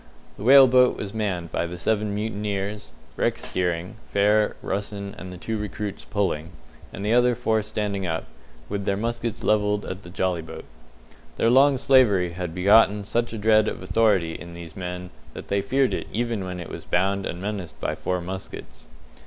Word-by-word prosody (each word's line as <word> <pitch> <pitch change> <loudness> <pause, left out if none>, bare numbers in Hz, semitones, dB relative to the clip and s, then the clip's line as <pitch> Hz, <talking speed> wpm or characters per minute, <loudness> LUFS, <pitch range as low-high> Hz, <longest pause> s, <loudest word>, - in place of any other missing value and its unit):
The - - -12
whale 135 +3 +9
boat 125 0 +4
was 100 0 -5
manned 95 -6 -2
by 85 - -1
the 90 +1 -7
seven 105 +2 0
mutineers, 105 -1 -3 0.3
Rex - - -1
steering, 90 +3 -2
Fair, 105 +1 +3
Russen, 100 0 -4
and 95 - -8
the 90 - -8
two 110 +4 -3
recruits 105 0 -5
pulling, 90 -5 -2 0.4
and 100 - -6
the 110 - +2
other 125 0 +4
four 110 0 +1
standing 105 -3 -3
up, 80 -1 -2 0.4
with 100 -1 -3
their 100 -1 0
muskets 115 0 -3
levelled 105 -1 +1
at 95 +1 -6
the 85 - -12
jolly 90 -1 -1
boat. 80 - -9 0.7
Their 115 - +2
long 135 +2 +6
slavery 115 -10 +4
had 90 -1 -5
begotten 105 +2 +5
such 120 +3 -1
a 115 - -5
dread 110 0 +4
of - - -4
authority 100 -8 +2
in 85 +1 -9
these 85 -2 -10
men 90 -1 -6 0.2
that - - -9
they 100 0 +1
feared 135 +6 +1
it - - -3
even 115 -3 -2
when 90 -1 -5
it 85 - -7
was - - -7
bound 95 +2 0
and 85 - -5
menaced 95 -5 -5
by - - -1
four 90 +4 -2
muskets. 95 +2 -8
100 Hz, 185 wpm, -24 LUFS, 90-110 Hz, 0.7 s, whale